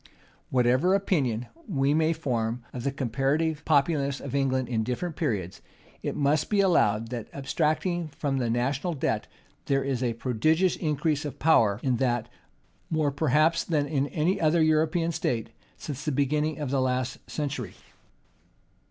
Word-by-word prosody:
Whatever 130 +9 +3
opinion 135 - 0 0.2
we 140 -7 +1
may 160 +1 +3
form 120 -7 -2
of 125 - -5
the 140 - 0
comparative 140 +4 0
populousness 140 -2 +2
of 140 - -7
England 130 -2 +1
in 115 -3 0
different 135 +8 -3
periods, 105 - -2 0.4
it - - -3
must 145 +1 +1
be 210 - +2
allowed 115 - +3
that, 120 -3 -4
abstracting 155 +5 -1
from 145 -2 -2
the 120 -2 0
national 135 +8 0
debt, 135 - -1 0.4
there 135 -1 +2
is 135 -2 -2
a 120 -2 0
prodigious 155 +10 +1
increase 150 -1 0
of 145 - -6
power 110 -10 +4
in 130 -3 +1
that, 120 -2 0 0.6
more 155 -3 +1
perhaps 155 +3 +2
than 150 -4 0
in 140 -1 0
any 165 +5 0
other 160 +1 +4
European 155 +2 +2
state, 115 -7 -2 0.3
since 145 -1 -6
the 150 - -1
beginning 150 +2 0
of 145 -4 -3
the 135 -1 +2
last 130 -1 -1
century. 145 -2 -4
140 Hz, 150 wpm, -27 LUFS, 125-155 Hz, 0.6 s, power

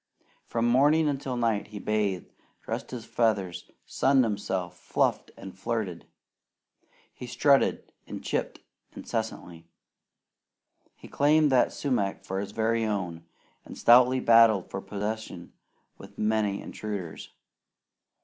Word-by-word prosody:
From 115 0 0
morning 145 +6 +4
until 135 -3 -2
night 115 -3 0
he 105 0 -9
bathed, 105 -3 -2 0.3
dressed - - -5
his 120 -3 -7
feathers, 100 -7 -1 0.2
sunned 135 -1 +3
himself, 95 -5 -3
fluffed - - 0
and 95 -1 -10
flirted. 95 -3 -4 1.1
He 125 - -9
strutted 140 +3 +2 0.2
and - - -7
"chipped" - - -3 0.3
incessantly. 90 -7 -5 1.3
He - - -14
claimed 150 +1 +3
that 125 -2 +3
sumac 120 -9 -2
for 95 +1 -3
his 100 0 -5
very 115 +1 0
own, 90 -6 -3 0.4
and - - -11
stoutly 125 +2 +6
battled 115 -5 +5
for 95 - -4
possession 105 -3 -5 0.5
with - - -13
many 105 -2 0
intruders. 100 -6 -6
110 Hz, 115 wpm, -27 LUFS, 100-125 Hz, 1.3 s, stoutly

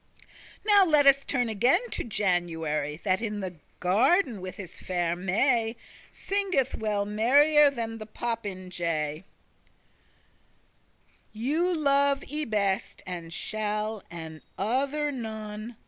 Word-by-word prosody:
Now 410 -2 +7
let 305 -5 +4
us 275 0 +6
turn 245 -3 0
again 250 - +2
to - - -2
January, 165 -8 -1
That 190 0 +1
in 210 -2 -3
the 185 -3 -5 0.2
garden 235 - +2
with 185 0 -7
his 185 -3 -9
faire 175 -2 -1
May 225 +6 +1 0.4
Singeth 380 -10 0
well 210 -2 -1
merrier 285 +8 +5
than 225 -4 -5
the 215 - -8
popinjay:* 205 -6 -5
*parrot 155 -1 -2 2.1
"You 310 +11 0
love 280 -1 +2
I 305 0 -1
best, 200 -3 -1
and 175 -2 -6
shall, 215 +2 -3
and 160 -2 -8 0.2
other 280 +8 0
none." 220 -2 -6
220 Hz, 115 wpm, -27 LUFS, 185-275 Hz, 2.1 s, Now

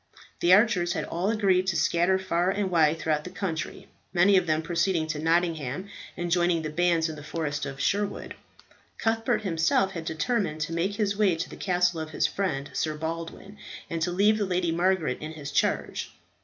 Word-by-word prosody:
The 175 - +3
archers 185 -4 +4
had - - -2
all 175 +4 -2
agreed 195 -4 +2
to 185 - +1
scatter 170 +3 +2
far 180 -1 0
and 195 -1 -1
wide 160 -2 +3
through 155 -1 0
the 180 - -7
country, 165 -5 -4 0.2
many 185 +3 +4
of 185 -2 +3
them 155 0 +1
proceeding 170 0 0
to 155 -1 -3
Nottingham 165 0 0 0.3
and 175 0 -3
joining 175 -1 +2
the 155 - -4
bands 170 0 +2
in 160 - -6
the 150 - -9
forest 150 -2 -3
of 135 -1 -7
Sherwood. 200 +4 -1 0.6
Cuthbert 225 -1 0
himself 180 +1 +2
had 165 -3 -6
determined 160 -1 -1
to 155 +2 -2
make 180 +5 -1
his 205 -1 0
way 200 -4 +3
to 165 +2 -3
the - - -10
castle 180 -2 +1
of 160 0 -5
his 155 - 0
friend, 145 -8 -2
Sir 155 -1 -1
Baldwin, 165 +5 -6 0.3
and 165 -1 -2
to 160 - +1
leave 210 +4 +3
the 205 - +1
Lady 180 -2 0
Margaret 175 0 +1
in 155 +1 -6
his 145 -2 -7
charge. - - -1
175 Hz, 195 wpm, -27 LUFS, 160-190 Hz, 0.6 s, archers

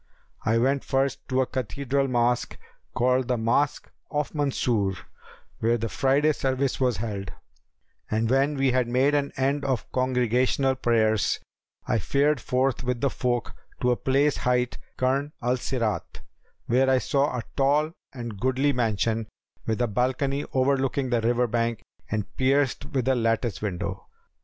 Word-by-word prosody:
I 115 +1 +2
went 135 +4 +2
first 135 0 0
to 130 0 +2
a - - +2
cathedral 135 +3 -1
mosque, 120 -1 0 0.4
called 125 0 +2
the 125 - +1
Mosque 120 +5 0 0.2
of 150 -1 -2
Mansur, 125 -9 0 0.7
where 115 +1 +2
the 115 0 -3
Friday 140 +6 +2
service 135 -1 -1
was 125 -4 +1
held, 100 -3 -4 0.8
and 110 +1 +1
when 135 +4 +2
we 135 -1 +2
had 125 -1 +1
made 130 +4 +2
an 140 -1 +1
end 140 +2 +1
of 130 -3 -2
congregational 130 +1 +1
prayers, 110 -4 +1 0.5
I 120 -3 +1
fared 145 +8 +1
forth 130 -1 0
with 125 -1 -1
the 140 +1 +1
folk 120 -3 -1 0.3
to 125 - +3
a - - +3
place 140 +4 +2
hight 125 0 0 0.2
Karn 135 +3 0
al 125 +1 0
Sirat, 120 -4 -3 0.4
where 130 +2 +3
I 130 - +5
saw 140 0 +1
a 120 - -3
tall 145 +3 +2 0.2
and 120 -6 -7
goodly 130 +4 +2
mansion, 115 -2 0 0.4
with 110 0 0
a - - +1
balcony 130 +5 0
overlooking 135 0 +1
the 120 -1 +2
river 120 +2 +2
bank 115 -1 -1 0.3
and 105 -2 -1
pierced 135 +1 +2
with 135 -5 -2
a 135 - +4
lattice 115 -2 0
window. 95 -1 -4
125 Hz, 150 wpm, -26 LUFS, 115-135 Hz, 0.8 s, I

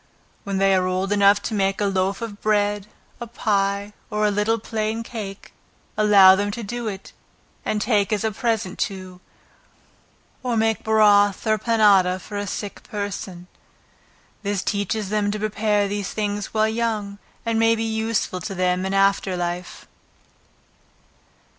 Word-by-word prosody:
When 200 -1 -2
they 195 0 +3
are 185 -1 +2
old 185 +2 -1
enough 200 0 +4
to - - -3
make 195 -1 0
a 205 - +1
loaf 195 +2 0
of 210 -3 -7
bread, 205 -1 +1 0.3
a 235 - -6
pie, 200 -3 -1 0.2
or 210 0 0
a 210 - +3
little 210 +3 +1
plain 220 0 -3
cake, 205 -4 -8 0.4
allow 200 -3 +7
them 205 +1 -1
to 235 - -5
do 240 +2 -4
it, 195 -2 -7 0.5
and 215 - -1
take 210 -2 +1
as 210 -1 0
a 220 - 0
present 215 -3 -2
to, 185 -2 -4 1.2
or 245 -2 -1
make 225 0 +1
broth 205 -2 +4
or 215 -1 +2
panada 205 -5 +4
for 205 - -10
a 205 - -4
sick 205 +1 -5
person. 200 -3 -6 1.0
This 200 -2 -2
teaches 205 0 -2
them 210 -1 0
to 210 - -2
prepare 210 -1 0
these 200 -1 -3
things 205 -1 -2
while 215 0 +2
young, 220 -3 -2 0.3
and 230 -1 0
may 225 0 +4
be 225 - -2
useful 220 -4 -1
to 195 +2 -5
them 180 +1 0
in 195 - -2
after 195 -1 +2
life. 175 +1 -4
205 Hz, 155 wpm, -22 LUFS, 195-220 Hz, 1.2 s, allow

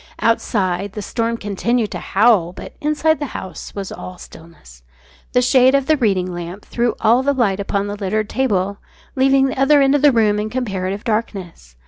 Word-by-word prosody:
Outside, 200 -4 0
the 210 - -5
storm 230 +1 -2
continued 215 +2 -1
to - - -4
howl, 200 -5 +2
but - - -10
inside 305 +1 +1
the 290 - -3
house 190 -1 -8 0.2
all 185 - -8
was - - -16
stillness. 160 - -16 0.5
The 250 - +3
shade 260 +1 +4
of 275 -1 +1
the 310 - +3
reading 200 -9 +1
lamp 175 +3 -7
threw 235 0 -1
all 235 +3 +4
the 280 +1 0
light 205 -6 +1
upon 200 0 -1
the 205 0 -4
littered 210 +1 -2
table, 200 -6 -1 0.4
leaving 270 0 +4
the 265 -1 -3
other 290 +2 +5
end 275 0 +4
of 290 - +2
the 290 0 +6
room 215 -3 +2
in 215 +1 -3
comparative 200 -5 -3
darkness. 195 - -4
215 Hz, 185 wpm, -19 LUFS, 195-260 Hz, 0.5 s, the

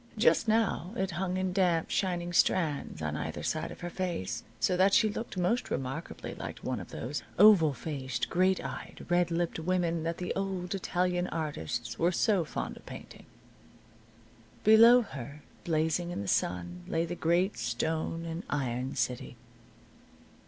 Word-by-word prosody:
Just 225 - +4
now 215 -4 +1
it 190 -5 -1
hung 180 +2 -2
in 185 -1 -1
damp, 175 -4 +2
shining 175 -2 -1
strands 150 - +1
on 75 -1 -2
either - - -4
side - - -1
of - - -10
her 175 - -4
face, 175 - -3 0.2
so 115 +11 +2
that 190 +2 +4
she 215 - +5
looked 225 -2 -6
most 185 +7 +1
remarkably 135 +5 -4
like - - -6
one - - -2
of - - -9
those 135 +5 -4 0.2
oval 195 -6 +7
faced, 130 -3 -3
great 185 +1 +2
eyed, - - -7
red 175 0 +3
lipped 170 -1 -1
women 170 -1 0
that 165 +1 -2
the 180 - -3
old 190 -2 -3
Italian 180 -1 0
artists 120 - -4
were 170 +2 +3
so 190 0 +2
fond 155 - -5
of - - -16
painting. - - -10 1.4
Below 230 +3 +8
her, 145 - -8 0.2
blazing 160 +1 +1
in 175 - -3
the - - -6
sun, 90 -1 -1
lay 165 +1 0
the 170 - -4
great 175 +3 +1
stone 160 +8 -2
and 165 +1 -4
iron 130 -2 -2
city. 125 0 -2
170 Hz, 160 wpm, -30 LUFS, 145-185 Hz, 1.4 s, Below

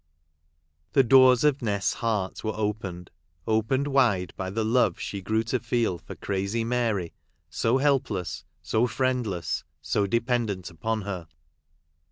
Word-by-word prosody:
The 135 - +6
doors 130 0 +6
of 145 -2 +3
Nest's 100 -4 0
heart 105 -5 -2
were 110 0 -2
opened 100 -5 -3 0.2
— 80 -1 -39
opened 110 +5 +1
wide 120 - +2
by 95 -1 -4
the 110 +4 -1
love 110 -5 +2
she 100 - -4
grew 110 +4 0
to 120 +3 -1
feel 115 -6 0
for - - -10
crazy 100 +3 -2
Mary, 115 -7 -1 0.4
so 115 +3 +2
helpless, 130 -10 0 0.2
so 115 +3 +1
friendless, 120 - -1 0.2
so 100 +7 0
de 115 +4 +2
pendent 115 -7 -2
upon 110 +6 -2
her. 95 -5 -5
110 Hz, 145 wpm, -26 LUFS, 95-125 Hz, 0.4 s, The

